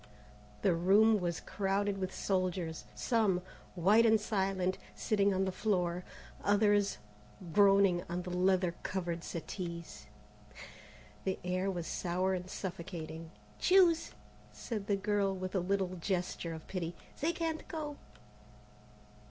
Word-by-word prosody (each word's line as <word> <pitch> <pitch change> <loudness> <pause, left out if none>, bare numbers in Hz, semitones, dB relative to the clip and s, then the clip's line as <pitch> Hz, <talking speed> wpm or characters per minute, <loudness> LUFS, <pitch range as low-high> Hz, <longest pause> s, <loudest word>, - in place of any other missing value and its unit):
The 185 - +4
room 205 +6 +5
was 175 -2 -2
crowded 195 +1 -1
with 185 0 -2
soldiers, 180 -4 -1
some, 210 -7 +1 0.3
white 200 +6 +5
and 220 -1 +5
silent, 190 -3 0 0.2
sitting 200 -2 +2
on 190 0 +1
the 190 - -1
floor, 180 -3 0 0.4
others 205 0 +3 0.6
groaning 195 -3 +5
on 175 +1 -2
the 180 - -6
leather 180 -1 +2
covered 175 -3 -3
settees. 170 0 -6 1.2
The 190 -1 -1
air 185 +2 0
was 175 -3 -3
sour 185 +3 0
and 180 0 -4
suffocating. 170 -4 -6 0.3
"Choose!" 360 -3 +4 0.4
said 210 -4 -5
the 205 - +3
girl 200 -1 +1
with 185 0 -5
a 190 - +2
little 185 0 0
gesture 175 -2 -2
of 160 - -10
pity; 175 -3 -4 0.2
"they 320 +4 +1
can't 325 -2 -3
go!" 300 -3 -5
190 Hz, 125 wpm, -33 LUFS, 180-205 Hz, 1.2 s, room